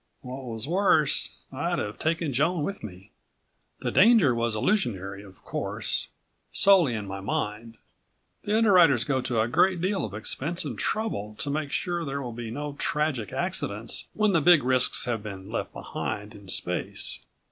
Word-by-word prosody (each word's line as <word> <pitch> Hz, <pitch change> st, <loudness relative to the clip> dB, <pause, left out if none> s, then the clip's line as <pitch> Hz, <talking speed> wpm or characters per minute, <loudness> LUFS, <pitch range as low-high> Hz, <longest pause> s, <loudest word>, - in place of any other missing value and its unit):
What 130 Hz, +1 st, -7 dB
was 115 Hz, 0 st, -4 dB
worse, 170 Hz, -4 st, +3 dB, 0.2 s
I'd -, -, -1 dB
have 105 Hz, 0 st, -4 dB
taken 160 Hz, -2 st, 0 dB
Joan 155 Hz, +5 st, +1 dB
with 195 Hz, +6 st, -4 dB
me. 95 Hz, -2 st, -10 dB, 0.7 s
The -, -, -1 dB
danger 205 Hz, -, +6 dB
was 115 Hz, -1 st, 0 dB
illusionary, 100 Hz, -, -1 dB
of 95 Hz, -2 st, -16 dB
course... -, -, -2 dB, 0.4 s
solely 180 Hz, -11 st, +5 dB
in 105 Hz, -2 st, -4 dB
my 95 Hz, 0 st, -6 dB
mind. 105 Hz, +3 st, -3 dB, 0.7 s
The 210 Hz, +1 st, +1 dB
underwriters 175 Hz, -, +5 dB
go 135 Hz, -3 st, 0 dB
to 120 Hz, -2 st, -1 dB
a 110 Hz, -, +2 dB
great 185 Hz, +9 st, +3 dB
deal 190 Hz, +3 st, 0 dB
of 100 Hz, -2 st, -5 dB
expense 150 Hz, +10 st, -1 dB
and 130 Hz, -6 st, -4 dB
trouble 110 Hz, -, -2 dB
to 140 Hz, -, -3 dB
make 150 Hz, -1 st, -2 dB
sure 175 Hz, 0 st, -1 dB
there 140 Hz, -2 st, -3 dB
will 120 Hz, -2 st, -5 dB
be 115 Hz, -1 st, -6 dB
no 145 Hz, +4 st, -4 dB
tragic 145 Hz, -9 st, 0 dB
accidents 105 Hz, +3 st, -3 dB
when 215 Hz, -1 st, +3 dB
the 165 Hz, -, +4 dB
big 165 Hz, -2 st, +6 dB
risks 130 Hz, 0 st, +3 dB
have 120 Hz, -3 st, -2 dB
been 100 Hz, -1 st, -8 dB
left 115 Hz, -, -3 dB
behind 105 Hz, +1 st, -5 dB
in 100 Hz, -2 st, -14 dB
space. -, -, -2 dB
130 Hz, 170 wpm, -27 LUFS, 110-170 Hz, 0.7 s, danger